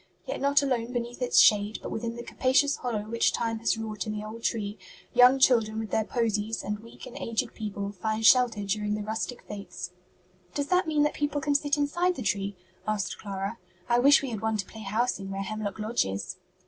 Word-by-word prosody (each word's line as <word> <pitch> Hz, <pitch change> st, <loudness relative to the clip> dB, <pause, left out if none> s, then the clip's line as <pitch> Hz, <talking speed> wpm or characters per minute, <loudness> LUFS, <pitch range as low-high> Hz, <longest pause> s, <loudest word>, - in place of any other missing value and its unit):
Yet -, -, -4 dB
not 280 Hz, +1 st, +4 dB
alone 250 Hz, -3 st, -1 dB
beneath 240 Hz, +1 st, -4 dB
its 250 Hz, -, +1 dB
shade, 210 Hz, 0 st, +5 dB
but -, -, -5 dB
within 230 Hz, +1 st, -3 dB
the 235 Hz, -, -6 dB
capacious 275 Hz, +4 st, +2 dB
hollow 230 Hz, -5 st, -2 dB
which 230 Hz, +2 st, +1 dB
time 225 Hz, -1 st, -1 dB
has 230 Hz, 0 st, +1 dB
wrought 220 Hz, -1 st, -4 dB
in 215 Hz, -, -2 dB
the 210 Hz, -, -5 dB
old 220 Hz, +2 st, -8 dB
tree, 210 Hz, -3 st, -2 dB, 0.3 s
young 250 Hz, +2 st, +7 dB
children 225 Hz, -5 st, +4 dB
with 220 Hz, -1 st, -4 dB
their 220 Hz, -, +2 dB
posies 220 Hz, -2 st, -1 dB
and 210 Hz, +1 st, -3 dB
weak 230 Hz, +2 st, -12 dB
and 255 Hz, -, -10 dB
aged 230 Hz, +1 st, -2 dB
people 205 Hz, -2 st, -4 dB
find 215 Hz, +3 st, -2 dB
shelter 235 Hz, -4 st, +5 dB
during 210 Hz, +1 st, -1 dB
the 210 Hz, -, -4 dB
rustic 220 Hz, +3 st, -4 dB
fêtes.'" 200 Hz, -3 st, -7 dB, 0.6 s
"Does 285 Hz, 0 st, -1 dB
that 360 Hz, -2 st, +3 dB
mean 305 Hz, -2 st, +2 dB
that 295 Hz, -, +1 dB
people 290 Hz, 0 st, -1 dB
can 290 Hz, +1 st, 0 dB
sit 290 Hz, +1 st, +2 dB
inside 345 Hz, +5 st, +1 dB
the 250 Hz, -, -5 dB
tree?" 200 Hz, 0 st, -1 dB, 0.3 s
asked 210 Hz, -3 st, -1 dB
Clara. 200 Hz, +2 st, -4 dB, 0.3 s
"I 240 Hz, 0 st, +3 dB
wish 280 Hz, +3 st, +6 dB
we 265 Hz, -, -3 dB
had 215 Hz, -, -4 dB
one 220 Hz, 0 st, 0 dB
to 200 Hz, -, -2 dB
play 220 Hz, -, -11 dB
house 220 Hz, +4 st, 0 dB
in 195 Hz, 0 st, -6 dB
where 195 Hz, 0 st, -3 dB
Hemlock 215 Hz, -1 st, -4 dB
Lodge 220 Hz, +2 st, +1 dB
is." 100 Hz, -, -4 dB
225 Hz, 215 wpm, -28 LUFS, 210-250 Hz, 0.6 s, young